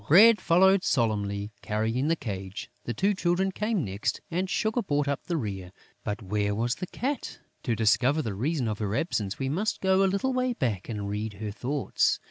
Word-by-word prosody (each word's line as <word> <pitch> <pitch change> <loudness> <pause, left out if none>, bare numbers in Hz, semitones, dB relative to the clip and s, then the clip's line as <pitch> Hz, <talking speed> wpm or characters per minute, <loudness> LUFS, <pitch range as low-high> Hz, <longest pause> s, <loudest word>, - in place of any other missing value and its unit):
Bread 215 +8 +8
followed 190 +3 +5
solemnly, 105 - 0
carrying 110 +6 0
the 165 - +3
cage; 95 - -6
the 120 - -2
two 200 - +2
Children 185 +1 +1
came 210 -4 -1
next; 100 +1 -2
and 180 +3 -1
Sugar 220 +6 +1
brought 145 -7 0
up 140 -1 -2
the 170 - -1
rear. 95 - -4 0.3
But 105 +2 -3
where 105 +1 0
was 120 +3 0
the 185 - -5
Cat? 275 +8 -3 0.2
To 120 -4 0
discover 125 +8 +3
the 110 - -3
reason 130 - -1
of 105 -1 -2
her 105 -1 -1
absence, 105 - -1
we 135 - -2
must 185 +11 -1
go 190 0 +3
a 195 - +4
little 200 +8 0
way 255 0 +1
back 115 - -2
and 105 -3 -3
read 105 +1 -3
her 105 +1 -5
thoughts. 135 +6 0
130 Hz, 195 wpm, -28 LUFS, -, 0.3 s, Bread